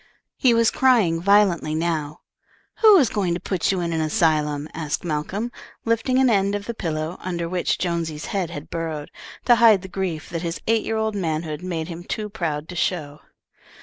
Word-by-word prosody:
He 245 -4 +3
was 230 -1 +4
crying 220 -11 +3
violently 190 -5 +3
now. 155 -2 -2 0.6
"Who 430 -3 +8
is 275 -8 +4
going 190 -6 -1
to - - -3
put 185 -1 -1
you 190 -2 -1
in 170 -1 -2
an 160 - 0
asylum?" 155 -4 +1
asked 155 -3 -3
Malcolm, 180 +9 -3 0.3
lifting 230 +3 +1
an 265 0 +4
end 200 -3 +2
of 205 0 -4
the 235 - -4
pillow 160 -4 -3
under 170 -2 -3
which 180 +1 0
Jonesy's 165 -3 -2
head 190 -4 -2
had 145 -2 -8
burrowed, 160 -3 -4 0.3
to 240 -2 +6
hide 220 -5 +6
the - - -7
grief 180 -4 -4
that 165 -1 -3
his 170 -1 -3
eight 225 -1 +2
year 225 - -2
old 220 0 0
manhood 160 -4 -3
made 170 -3 -3
him 170 0 -7
too 210 +3 -4
proud 160 -7 -3
to 180 - -7
show. 155 -4 -2
175 Hz, 190 wpm, -23 LUFS, 160-210 Hz, 0.6 s, Who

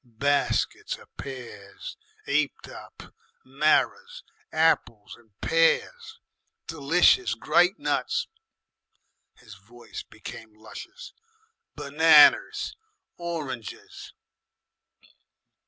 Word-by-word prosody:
Baskets 140 +4 -1
of - - -20
pears 115 -7 -9 0.3
'eaped 145 0 -1
up, - - -13 0.3
marrers, 310 - 0 0.3
apples 135 -10 0
and 120 -2 -24
pears, 445 - +1 0.5
d'licious 165 - +2
great - - +2
nuts." 475 +1 -1 1.1
His 110 -2 -15
voice 115 +5 -11
became 110 -1 -11
luscious 345 - -11 0.6
"Benanas, - - +4 0.4
oranges." 155 -10 -7
145 Hz, 70 wpm, -26 LUFS, 115-170 Hz, 1.1 s, Benanas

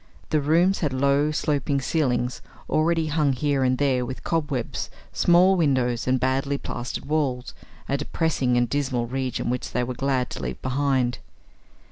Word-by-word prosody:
The 155 -1 +2
rooms 170 +6 +3
had 150 -5 -1
low 140 +3 +2
sloping 145 -2 0
ceilings 125 -5 0 0.3
already 165 +1 +2
hung 150 -2 +1
here 140 +1 0
and 130 0 +2
there 130 -3 +1
with 130 +1 -6
cobwebs, 145 -7 -2 0.2
small 180 +2 +5
windows, 130 -8 +1
and 130 0 +2
badly 135 +2 0
plastered 125 -2 -5
walls 140 -4 -1 0.3
a 140 - 0
depressing 140 -4 0
and 120 0 +2
dismal 130 -3 -1
region 130 0 -2
which 125 - -4
they 125 - +1
were 125 +1 -3
glad 130 0 -1
to - - -6
leave 65 -1 -4
behind. 130 -2 0
135 Hz, 155 wpm, -24 LUFS, 125-150 Hz, 0.3 s, small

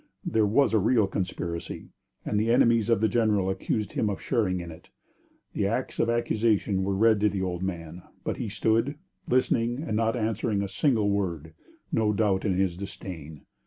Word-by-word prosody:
There 110 -2 +2
was 130 +4 +3
a 110 - +4
real 110 +2 +3
conspiracy, 90 -3 -4 0.4
and 105 - 0
the 110 +2 0
enemies 115 -2 +4
of 115 -3 +3
the 110 - +4
general 105 -4 +2
accused 100 +2 -2
him 110 - 0
of 100 - -3
sharing 105 -8 0
in 85 -1 -7
it. 80 - -14 0.6
The 100 - 0
acts 120 +5 -3
of 115 - +2
accusation 110 -4 +1
were 95 +1 0
read 110 +1 +4
to 105 +1 +3
the 95 -1 -2
old 90 -1 -3
man, 85 -2 -5 0.2
but - - -2
he 110 - -3
stood, 115 +6 +1 0.3
listening 120 +1 +1
and 110 - -2
not 115 +1 +1
answering 110 -2 -1
a - - -2
single 110 -3 +1
word, 85 -6 -2 0.4
no 110 -1 +2
doubt 100 -2 +1
in 95 -3 +1
his 95 -3 +1
disdain. 85 -6 -8
105 Hz, 185 wpm, -27 LUFS, 95-115 Hz, 0.6 s, a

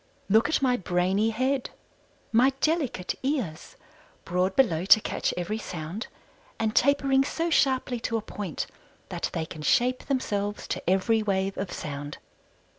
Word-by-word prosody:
Look 220 +3 +4
at 315 - +1
my 250 -2 +3
brainy 190 +3 +1
head, 260 +3 0 0.6
my 255 +4 +4
delicate 290 - 0
ears 255 - -3 0.5
broad 180 +2 0
below 180 -11 +3
to 200 +3 +7
catch - - -1
every 180 +5 -2
sound, 180 +3 -6 0.5
and 220 0 -1
tapering 275 0 +4
so 330 +4 -2
sharply 260 -5 +2
to 230 0 -1
a - - -3
point 200 -7 -4 0.4
that - - -3
they 160 - -2
can 160 -1 -9
shape 250 +10 +2
themselves 205 -6 -2
to - - -2
every 205 +4 +3
wave 195 -2 0
of 195 -1 -4
sound. 145 0 -6
220 Hz, 145 wpm, -27 LUFS, 185-260 Hz, 0.6 s, to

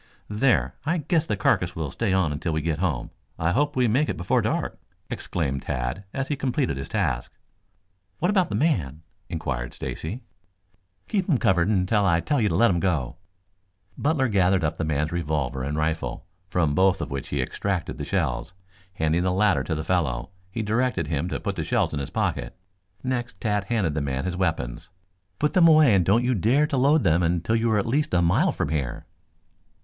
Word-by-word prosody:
"There, 120 +5 +2
I 165 +4 0
guess 160 +1 0
the 105 - -1
carcass 90 -2 +1
will 80 -4 -3
stay 115 -4 -1
on 95 -5 +2
until 75 +3 -2
we 80 -1 -1
get 80 -1 -1
home. 90 -4 -1 0.3
I 80 +1 +1
hope 145 +8 +1
we 125 -2 +3
make 135 +8 +2
it - - -2
before 90 - +1
dark," - - -2 0.3
exclaimed 70 -6 -2
Tad 60 +11 -3
as 135 0 -3
he 145 - +1
completed 135 - -1
his 70 0 -6
task. 60 -2 -1 0.9
"What 175 +4 +1
about 190 -4 +2
the - - -2
man?" 80 - 0 0.3
inquired 65 -7 -3
Stacy. 105 +11 -5 0.8
"Keep 195 -2 -1
him 150 - +4
covered 90 -5 +2
until 100 +1 +2
I 85 -4 +3
tell 145 - 0
you 105 - +2
to 85 - -1
let 95 -3 +4
go." 80 -8 -1 0.8
Butler 145 -3 +1
gathered 95 -4 +2
up 80 +1 -1
the - - -2
man's 75 0 0
revolver 75 -6 -2
and 70 +3 -2
rifle, 80 +1 -2 0.2
from 80 -6 +1
both 95 +3 +3
of - - -4
which 70 -1 -4
he - - -2
extracted 95 -4 -2
the - - -3
shells. - - -2 0.4
Handing 80 +1 +1
the 90 0 +1
latter 100 +1 +2
to 80 - -1
the 80 - -3
fellow, 80 -6 -1 0.2
he 110 +4 -3
directed 110 - 0
him 80 +2 -1
to - - -3
put - - -3
the - - -2
shells - - 0
in 75 - -2
his 70 - -4
pocket. - - -2 0.5
Next 125 -2 -3
Tad 105 -3 0
handed 100 -9 0
the 75 - -1
man 70 0 -2
his 90 -1 -2
weapons. 80 -7 -2 0.5
"Put 150 - 0
them 180 -4 +6
away 155 -7 +6
and 95 -2 +4
don't 105 +7 +3
you 130 - +2
dare 120 - +3
to 140 - -2
load 140 +4 +4
them 85 -2 +3
until 85 +5 +1
you 115 0 +1
are 110 - +3
at 100 - +1
least 145 +3 0
a 90 - +3
mile 85 +1 +3
from - - -2
here." 75 0 -3
90 Hz, 200 wpm, -25 LUFS, 80-120 Hz, 0.9 s, them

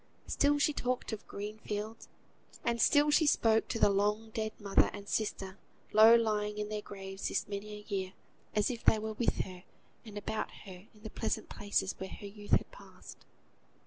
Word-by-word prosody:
Still 290 +1 +2
she 290 +1 +2
talked 250 -3 -2
of 215 - -7
green 210 +2 -6
fields, 215 +1 -5 0.6
and 235 -1 0
still 295 +3 +5
she 300 +1 +4
spoke 225 -5 +3
to - - -2
the 205 - +5
long 210 +3 0
dead 220 0 -2
mother 200 -2 +3
and 205 -1 -8
sister, 195 -3 -2 0.3
low 220 +2 +9
lying 210 -2 +1
in 210 0 -3
their 210 -1 -3
graves 195 -1 -6
this - - -1
many 205 +1 -5
a 210 0 -9
year, 190 -1 -2 0.4
as 210 +3 +2
if 235 - -6
they 220 - +5
were 220 0 -3
with 230 +2 0
her 180 -1 -8 0.4
and 215 -3 -9
about 210 +1 -3 0.2
her, 190 +1 -11
in 210 - -20
the 220 - -7
pleasant - - -2
places 200 -1 -1
where 190 - -5
her - - -9
youth 205 +1 -8
had - - +3
passed. - - -14
210 Hz, 190 wpm, -32 LUFS, 200-225 Hz, 0.6 s, low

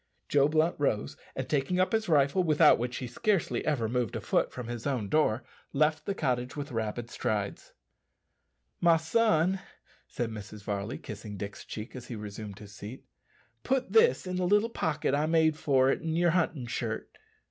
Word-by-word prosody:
Joe 140 -1 +4
Blunt 155 +2 +2
rose, 110 -7 0 0.2
and - - -3
taking 150 +5 0
up 185 - +3
his 220 -2 0
rifle 145 +4 +4
without 155 -4 +5
which 125 +1 -2
he 130 - -4
scarcely 185 - 0
ever 135 -7 +1
moved 120 -2 -1
a - - -1
foot - - +1
from 125 -2 -6
his 120 +1 -4
own 120 -8 -1
door 130 -7 +2 0.3
left 155 +2 +1
the 200 - -1
cottage 125 -4 -1
with 145 -2 -5
rapid 115 +1 -3
strides. 105 -2 -3 1.1
"My 170 -1 +5
son," 185 +1 +2 0.5
said 120 -2 -3
Mrs. 105 -1 -8
Varley, 100 +3 -3
kissing 105 -1 -8
Dick's 100 +1 -6
cheek 110 +4 -7
as 125 -1 -8
he 120 - -5
resumed 105 -1 -7
his 105 -1 -12
seat, 105 +5 -9 0.6
"put 260 0 0
this 455 - +5
in 185 0 -3
the 180 -1 +1
little 210 +4 +3
pocket 155 -8 -1
I 150 +2 +2
made 160 -1 +3
for 135 -3 +3
it - - -1
in 160 -1 -2
your 170 0 +3
hunting 165 -6 0
shirt." 120 - -4
140 Hz, 180 wpm, -29 LUFS, 115-165 Hz, 1.1 s, without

